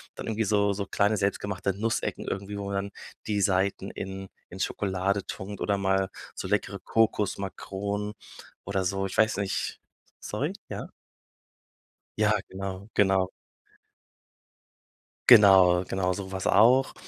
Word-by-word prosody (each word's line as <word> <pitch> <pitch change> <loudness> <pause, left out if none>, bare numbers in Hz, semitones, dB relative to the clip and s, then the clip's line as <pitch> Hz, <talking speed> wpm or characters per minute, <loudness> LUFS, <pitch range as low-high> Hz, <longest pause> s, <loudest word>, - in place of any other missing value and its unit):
dann - - -7
irgendwie 110 0 0
so 100 0 +2
so 100 0 -3
kleine, 100 +3 +2
selbst 100 0 0
gemachte 100 -1 -2
Nussecken 110 +4 -2
irgendwie, 100 +1 -4
wo 100 - -4
man 100 0 -3
dann 100 +1 -2 0.4
die 105 -1 0
Seiten 95 0 +1
in 95 0 -6 0.2
in 95 - -10
Schokolade 95 0 -1
tunkt 100 +1 -7
oder 100 - +1
mal 95 0 +1 0.3
so - - -5
leckere 100 -1 -1
Kokosmakronen 100 -1 -1 0.5
oder 100 -1 -1
so. 95 +1 -1
Ich 95 - -7
weiß 110 -1 +3
nicht, 100 -1 -2 0.4
sorry, - - -3 0.2
ja? - - -6 1.3
Ja, 105 0 +3 0.2
genau, 95 +1 -6
genau. 95 -2 +3 2.0
Genau, 95 -6 +8
genau 95 0 -1
so 95 +1 -6
was 95 -1 -3
auch. 125 +6 +5
100 Hz, 135 wpm, -27 LUFS, 95-105 Hz, 2.0 s, Genau